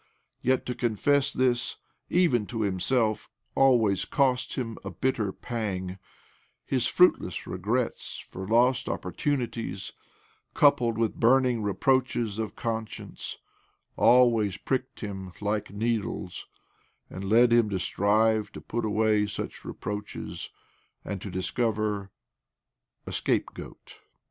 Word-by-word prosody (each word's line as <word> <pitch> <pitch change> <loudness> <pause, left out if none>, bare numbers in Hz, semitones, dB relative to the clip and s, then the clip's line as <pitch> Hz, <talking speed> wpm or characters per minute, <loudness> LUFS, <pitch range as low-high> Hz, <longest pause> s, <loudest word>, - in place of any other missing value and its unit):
Yet 130 +1 +1
to 125 - -2
confess 125 +5 +1
this, 125 -2 +1 0.3
even 130 - +3
to 115 -3 -3
himself, 110 +3 0 0.2
always 115 -8 +4
cost 130 -3 +1
him 115 -3 -4
a - - -4
bitter 115 -6 -1
pang: 95 -5 -4 0.7
his - - +1
fruitless - - +3
regrets 110 +7 -2
for 95 0 -6
lost 120 +4 +3
opportunities, 115 - -3 0.6
coupled 120 -6 +4
with 115 -2 -1
burning 125 -1 +4
reproaches 115 0 +1
of 110 -3 -3
con 115 -1 -2
science, - - -8 0.6
always 115 -5 +4
pricked 130 +3 -3
him 95 -4 -6
like 105 0 -1
needles, 105 -3 -3 0.6
and 95 +1 -6
led 115 +2 +5
him 120 -3 +4
to 100 - -1
strive 105 +3 +2
to - - -7
put 120 - -4
away 105 0 +2
such 100 - -5
reproaches 105 0 -6 0.6
and 100 -2 -4
to 100 - -6
discover 105 +1 -1 1.0
a - - -6
scapegoat. - - -3
110 Hz, 115 wpm, -27 LUFS, 100-125 Hz, 1.0 s, led